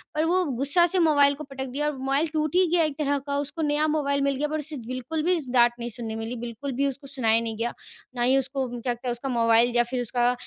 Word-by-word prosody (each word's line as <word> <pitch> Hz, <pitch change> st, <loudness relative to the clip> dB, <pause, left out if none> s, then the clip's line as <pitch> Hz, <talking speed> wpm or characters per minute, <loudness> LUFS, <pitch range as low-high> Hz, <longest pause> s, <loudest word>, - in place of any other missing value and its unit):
पर 310 Hz, +1 st, +2 dB
वो 365 Hz, +3 st, +2 dB
गुस्सा 285 Hz, +5 st, +2 dB
से 365 Hz, +2 st, 0 dB
मोबाइल 290 Hz, -4 st, +5 dB
को 305 Hz, -, -8 dB
पटक 270 Hz, -2 st, -6 dB
दिया 285 Hz, +4 st, -2 dB
और 300 Hz, -2 st, -2 dB
मोबाइल 275 Hz, +4 st, 0 dB
टूट 310 Hz, 0 st, -1 dB
ही 370 Hz, 0 st, +5 dB
गया 345 Hz, -1 st, +4 dB
एक 305 Hz, -3 st, -1 dB
तरह 285 Hz, -1 st, +1 dB
का, 280 Hz, +1 st, -3 dB
उसको 290 Hz, +3 st, -4 dB
नया 300 Hz, 0 st, +2 dB
मोबाइल 280 Hz, -2 st, 0 dB
मिल 275 Hz, 0 st, +1 dB
गया 295 Hz, +3 st, -1 dB
पर 310 Hz, +1 st, -2 dB
उसे 305 Hz, +1 st, -6 dB
बिल्कुल 255 Hz, +5 st, -3 dB
भी 355 Hz, +1 st, +2 dB
डाँट 240 Hz, -1 st, +5 dB
नहीं 235 Hz, 0 st, -4 dB
सुनने 225 Hz, -1 st, -6 dB
मिली, 225 Hz, +2 st, -4 dB
बिल्कुल 240 Hz, +4 st, -5 dB
भी 275 Hz, +2 st, 0 dB
उसको 275 Hz, +1 st, -6 dB
सुनाया 230 Hz, -5 st, +2 dB
नहीं 225 Hz, -1 st, -4 dB
गया। 235 Hz, +2 st, -2 dB, 0.4 s
ना 245 Hz, -, -3 dB
ही 255 Hz, +3 st, +4 dB
उसको 270 Hz, 0 st, -1 dB
क्या 245 Hz, 0 st, -1 dB
कहते, 240 Hz, +1 st, -6 dB
उसका 240 Hz, +3 st, -4 dB
मोबाइल 235 Hz, 0 st, +3 dB
या 240 Hz, -, +5 dB
फिर 245 Hz, +1 st, -3 dB
उसका 245 Hz, +1 st, +1 dB
275 Hz, 260 wpm, -25 LUFS, 240-300 Hz, 0.4 s, मोबाइल